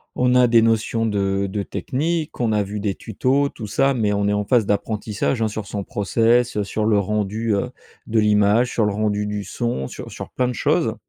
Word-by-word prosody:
on 125 0 +2
a 125 -1 +6
des 115 -1 +5
notions 115 0 +1
de 100 -2 0
de 100 +2 -3
technique 150 - -3
on 115 -2 +1
a 105 -1 +2
vu 105 +1 -5
des 100 -2 -2
tutos 135 +6 0
tout 110 -6 -8
ça, 135 +7 +2
mais 105 -5 0
on 100 0 0
est 105 - +1
en 105 0 -1
phase 120 -1 +3
d'apprentissage, 105 +3 -1
hein, 110 - +2
sur 105 -1 -5
son 100 -1 -4
process, 115 +4 +1
heu, 105 - +1
sur 105 +2 -2
le 110 -2 +3
rendu, 105 +2 -1
heu, 110 +5 -1 0.4
de 110 0 +1
l'image, 105 +3 +3
sur 110 - +2
le 105 - 0
rendu 105 0 -1
du 105 0 -3
son 100 - -3
sur - - -8
sur - - -8
plein 125 -1 0
de 125 - -2
choses - - +1
105 Hz, 220 wpm, -21 LUFS, 105-120 Hz, 0.4 s, a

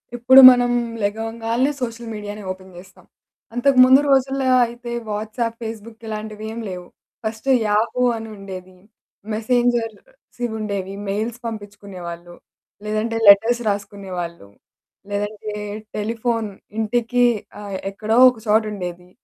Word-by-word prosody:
ఇప్పుడు 260 +3 +7
మనం 245 -1 +2 0.3
లెగవంగాల్నే 225 +5 -1
సోషల్ 230 -1 -4
మీడియానే 210 0 -7
ఓపెన్ 185 0 -10
జేస్తాం. 190 +3 -15 0.5
అంతకు 255 +2 +2
ముందు 260 +1 +7
రోజుల్లో 270 0 +2 0.2
అయితే 240 +1 -8 0.2
వాట్సాప్, 220 +2 -3
ఫేస్‌బుక్ 225 0 -8
ఇలాంటివేం 215 +1 -6
లేవు. 180 -1 -7 0.4
First 220 +4 -4 0.2
Yahoo 220 +4 +1 0.2
అనుండేది. 195 -4 -9 0.6
మెసెంజర్సివుండేవి. 225 - -2 0.2
మెయిల్స్ 220 +4 -2
పంపించుకునే 205 -3 -8
వాళ్ళు. 170 0 -9 0.5
లేదంటే 215 +2 -1
లెటర్స్ 225 +4 +6
రాసుకునే 200 -1 -5
వాళ్ళు. 170 -10 -6 0.6
లేదంటే 205 +1 -4 0.5
టెలిఫోన్ 225 +1 -1 0.3
ఇంటికి 240 +2 +1 0.4
ఆహ్, 200 -2 -5
ఎక్కడో 215 +3 -1
ఒక 250 - -7
చోటుండేది. 200 -5 -1
220 Hz, 105 wpm, -21 LUFS, 205-235 Hz, 0.6 s, ఇప్పుడు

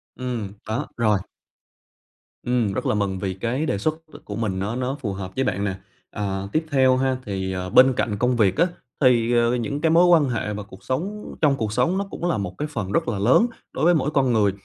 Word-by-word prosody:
Ừm, 120 -6 -4
có, 110 +7 -3
rồi. 105 -4 +2 1.2
Ừm, 120 -5 0
rất - - -3
là - - +1
mừng 95 -2 -1
vì 95 -1 -2
cái 120 +10 -2
đề 100 - 0
xuất, 155 +10 0 0.2
ờ, - - -10
của 105 - -6
mình 100 -4 -2
nó 105 +4 -2
nó 130 +2 -2
phù 105 -6 -3
hợp 95 -1 -6
với 135 - +1
bạn 100 - -1
nè. 100 -2 -1 0.4
Ờ, 100 -1 -3
tiếp 160 +1 0
theo 130 -2 +4
ha, 130 -1 +1
thì, 95 -2 -3
à, 90 0 -4
bên 130 +5 +6
cạnh 105 -4 -1
công 125 +2 +1
việc 100 -5 +2
á, 170 +3 +4 0.3
thì, 120 -3 +4
ờ, 120 +1 +3
những 140 +5 -3
cái 160 - +3
mối 170 +2 +6
quan 160 -6 +5
hệ 110 -3 -2
và 105 0 -5
cuộc 95 -1 -15
sống 195 +11 -4
trong 145 -3 +4
cuộc 110 -3 -2
sống 130 +11 +1
nó 200 - -1
cũng - - -5
là 165 - +1
một 90 -3 -4
cái 150 - -2
phần 105 -10 -4
rất 165 +6 +1
là 100 - -1
lớn 130 - +4 0.3
đối 150 - 0
với 175 - +6
mỗi 150 -1 0
con 130 -4 +2
người. 105 -3 +3
120 Hz, 240 wpm, -23 LUFS, 100-135 Hz, 1.2 s, bên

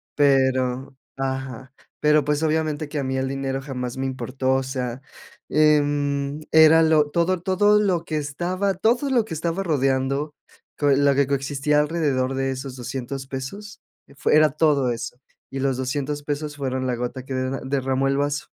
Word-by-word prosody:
pero, 130 -1 +2 0.2
ajá, 130 -1 -4 0.3
pero, 150 0 +4
pues, 150 +1 0
obviamente, 155 -1 0
que 150 0 -3
a - - -1
mí 130 0 -2
el 130 0 -1
dinero 135 0 -3
jamás 125 -3 -5
me 135 - -2
importó, 130 +1 -2
o 135 - 0
sea, 130 -1 -4 0.5
em, 145 -1 +2
era 160 +1 +7
lo 155 -2 +3
todo 170 +2 +1
todo 205 +3 +3
lo 185 -5 +1
que 155 - -2
estaba 175 +7 -1
todo 240 +9 +1
lo 240 -5 +2
que 180 - -7
estaba 165 +4 -2
rodeando, 135 -2 0 0.4
con 145 -1 +3
lo 140 -1 +4
que 140 -1 +2
coexistía 140 +2 0
alrededor 145 -4 0
de 135 0 -1
esos 130 0 -6
$200 130 +1 -5
pesos, 140 +11 -7 0.4
fue, 150 - +2
era 155 0 +6
todo 145 -4 +2
eso, 120 +1 -5 0.3
y 135 - -4
los 135 -1 0
$200 145 +3 -3
pesos, 145 0 -4
fueron 130 -2 -2
la 125 - 0
gota 125 +2 -4
que 135 - -6
de 130 +1 -2
derramó 135 0 0
el 135 0 +1
vaso. 145 -2 -1
140 Hz, 170 wpm, -23 LUFS, 130-155 Hz, 0.5 s, era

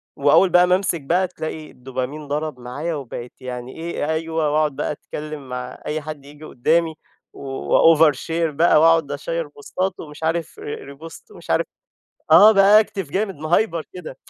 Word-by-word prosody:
وأوّل 145 +7 +4
بقى 180 0 +5
ما 180 - +4
امسك 185 -4 -1
بقى، 175 +7 +1
تلاقي 155 -3 -7
الدوبامين 130 +4 -6
ضرب 150 -1 -3
معايا، 140 +7 -4
وبقيت 125 -3 -7
يعني 125 0 -7
إيه، 165 -2 -3
أيوه، 160 -1 -1
وأقعد 150 -1 +1
بقى - - -2
أتكلّم 150 -2 -8
مع 125 0 -6
أي 155 +1 -2
حد 150 -2 -8
ييجي 145 +2 -14
قُدَّامي، 160 +6 0 0.4
وover 150 +3 +4
share 165 +4 -2
بقى، 155 +1 +4
وأقعد 165 -3 +4
أشيّر 165 +3 -3
بوستات، 180 +6 -4
ومش 150 0 -10
عارف 165 0 -2
re 140 -1 -7
repost، 165 - -13
ومش 420 - -14
عارف - - +2 0.7
آه، 215 +2 +9
بactive 195 -4 +4
جامد، 195 +1 -1
مهيبر 165 +2 0
كده. 165 -7 -9
155 Hz, 160 wpm, -21 LUFS, 140-170 Hz, 0.7 s, آه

